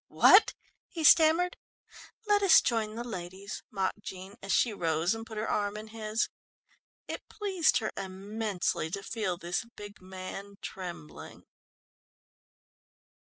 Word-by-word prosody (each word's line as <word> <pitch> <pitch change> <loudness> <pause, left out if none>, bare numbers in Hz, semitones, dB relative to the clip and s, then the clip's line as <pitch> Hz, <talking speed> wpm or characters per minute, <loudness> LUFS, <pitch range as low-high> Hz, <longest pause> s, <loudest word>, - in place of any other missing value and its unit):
"Wha - - +6
what?" 395 - +7 0.3
he 330 -3 -5
stammered. 325 +3 +6 0.7
"Let 415 -1 +3
us 390 -4 +8
join 220 -2 -1
the 235 - -4
ladies," 190 -3 -6
mocked 195 +1 -2
Jean, 190 -1 -8
as 195 - -4
she 235 - +3
rose 165 -1 +1
and 225 0 -7
put 220 - -8
her 215 - -2
arm 205 0 -1
in 215 +1 -8
his. 220 0 -1 0.8
It - - -7
pleased 380 -6 +2
her 215 - -2
immensely 195 -2 -2
to 195 +4 -5
feel 205 -6 -2
this 175 +2 -2
big 205 -1 -10
man 190 +2 -8
trembling. 175 -5 -8
210 Hz, 135 wpm, -30 LUFS, 190-230 Hz, 0.8 s, us